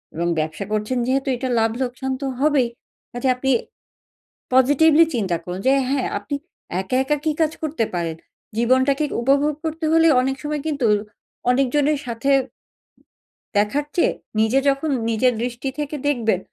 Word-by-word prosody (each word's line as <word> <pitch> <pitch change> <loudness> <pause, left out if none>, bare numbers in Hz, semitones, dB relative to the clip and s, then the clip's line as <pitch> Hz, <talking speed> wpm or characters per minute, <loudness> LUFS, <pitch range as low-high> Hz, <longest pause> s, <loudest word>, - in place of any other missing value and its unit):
এবং 170 +2 -1
ব্যবসা 155 +6 -3
করছেন 215 +4 -1
যেহেতু 270 +2 0
এটা 260 0 -3
লাভ-লোকসান 250 +3 -1
তো - - -2
হবেই। 285 -3 +3 0.4
কাজেই 245 +2 0
আপনি 265 +1 0 1.0
পজিটিভলি 290 +5 +5
চিন্তা 190 -7 0
করুন 180 +1 -5
যে 265 - +5 0.2
হ্যাঁ 275 -2 0
আপনি 205 +8 -6 0.5
একা, 190 +7 -2
একা 295 +2 +1
কি 315 - +2
কাজ 315 -1 +2
করতে 295 -7 0
পারেন। 165 -2 -2 0.4
জীবনটাকে 260 +5 +2 0.2
উপভোগ 280 +3 +2
করতে 320 0 -3
হলে 325 0 +5
অনেক 265 +1 -1
সময় 295 -1 -2
কিন্তু 285 -6 0 0.6
অনেকজনের 275 +3 +2
সাথে 235 +3 -2 1.3
দেখার 210 +9 +1
চেয়ে 345 - +3 0.3
নিজে 220 +5 +3
যখন 275 +3 0 0.2
নিজের 245 +3 +2
দৃষ্টি 245 +2 -3
থেকে 295 0 -3
দেখবেন 225 -9 +1
260 Hz, 140 wpm, -21 LUFS, 230-290 Hz, 1.3 s, পজিটিভলি